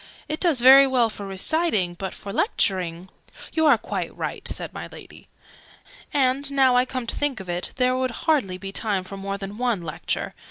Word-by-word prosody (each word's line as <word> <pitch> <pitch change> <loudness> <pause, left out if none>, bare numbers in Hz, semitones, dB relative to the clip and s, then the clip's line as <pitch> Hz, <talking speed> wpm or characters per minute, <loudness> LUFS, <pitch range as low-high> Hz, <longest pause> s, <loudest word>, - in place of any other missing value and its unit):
It 310 - -3
does 320 -9 +3
very 270 +2 +9
well 245 -4 +2
for 200 -2 -8
reciting; 195 - 0
but 190 +2 -6
for 200 - -8
lecturing 185 - 0 0.2
" - - -14
"You 320 -1 +3
are 280 -6 +6
quite - - -5
right," - - -4
said - - -5
my - - -7
Lady. - - -13 0.8
"And, 275 0 +1
now 265 -2 +4
I 250 +1 +4
come 255 -1 -4
to - - -4
think 290 -5 -1
of 190 - -9
it, 175 +1 -2
there 255 0 +2
would 255 0 0 0.2
hardly 265 - +1
be 195 +1 -7
time 200 -2 -1
for 190 +2 -9
more 195 0 -4
than 200 +2 -8
one 240 -8 0
Lecture. 165 +1 -3
230 Hz, 200 wpm, -24 LUFS, 195-270 Hz, 0.8 s, very